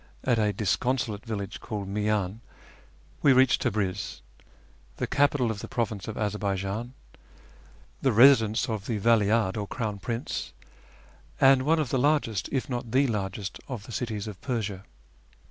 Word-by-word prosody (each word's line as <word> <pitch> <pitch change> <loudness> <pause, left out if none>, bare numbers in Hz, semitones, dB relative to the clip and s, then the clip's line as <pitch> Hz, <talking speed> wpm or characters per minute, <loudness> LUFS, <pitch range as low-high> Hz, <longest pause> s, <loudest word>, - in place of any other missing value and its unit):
at 120 -3 +2
a 105 -1 +2
disconsolate 110 +1 -1
village 105 -5 -5
called 105 -3 -5
Miyan, 105 0 -1 0.8
we 140 - +6
reached 130 0 +4
Tabriz, 100 -3 -2 0.7
the - - -1
capital 140 -4 +2
of 105 - -5
the - - -7
province 110 -4 -3
of 110 - -5
Azarbaijan, 105 +2 -2 1.1
the 135 - +3
residence 115 -2 +5
of 110 -3 -4
the 115 - -1
Vali 110 0 +3
ahd, 110 -2 +1
or 105 -1 -3
Crown 105 -4 -3
Prince, 115 +4 -4 0.9
and 135 -1 +6
one 165 +1 +4
of 150 -5 -1
the 130 - +1
largest, 140 -8 +1
if 135 - -1
not 120 -2 -4
the 135 +3 +4
largest, 100 -4 -3
of 125 -6 -5
the 120 - -10
cities 110 -4 -3
of 105 -4 -8
Persia. 105 -6 -3
110 Hz, 150 wpm, -27 LUFS, 100-125 Hz, 1.1 s, we